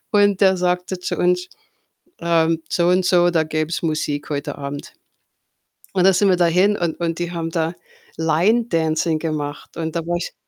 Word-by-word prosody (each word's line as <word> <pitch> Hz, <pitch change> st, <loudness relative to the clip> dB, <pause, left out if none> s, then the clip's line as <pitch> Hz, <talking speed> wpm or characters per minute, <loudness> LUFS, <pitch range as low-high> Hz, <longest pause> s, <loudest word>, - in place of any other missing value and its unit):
Und 205 Hz, -1 st, +3 dB
der 190 Hz, -1 st, +5 dB
sagte 180 Hz, +1 st, -1 dB
zu 180 Hz, -, -3 dB
uns, 180 Hz, 0 st, +1 dB, 0.7 s
ähm, 165 Hz, -1 st, +1 dB
so 175 Hz, 0 st, +1 dB
und 180 Hz, 0 st, +3 dB
so, 175 Hz, -1 st, +4 dB
da 165 Hz, -2 st, +2 dB
gäb 155 Hz, 0 st, -2 dB
es 170 Hz, -, -3 dB
Musik 155 Hz, -2 st, -2 dB
heute 145 Hz, 0 st, -4 dB
Abend. 140 Hz, 0 st, -6 dB, 1.0 s
Und 185 Hz, -1 st, +2 dB
dann 195 Hz, -, +6 dB
sind 195 Hz, +2 st, +3 dB
wir 185 Hz, -, +5 dB
dahin 180 Hz, +4 st, +3 dB
und 170 Hz, -1 st, -2 dB
und 165 Hz, -1 st, -2 dB
die 175 Hz, 0 st, -3 dB
haben 165 Hz, -1 st, -3 dB
da 165 Hz, 0 st, -1 dB, 0.4 s
„Line 175 Hz, +9 st, +2 dB
Dancing“ 160 Hz, -3 st, 0 dB
gemacht. 150 Hz, -2 st, -5 dB
Und 160 Hz, 0 st, -4 dB
da -, -, +1 dB
war 175 Hz, -, 0 dB
ich 175 Hz, -, -5 dB
170 Hz, 185 wpm, -20 LUFS, 160-180 Hz, 1.0 s, dann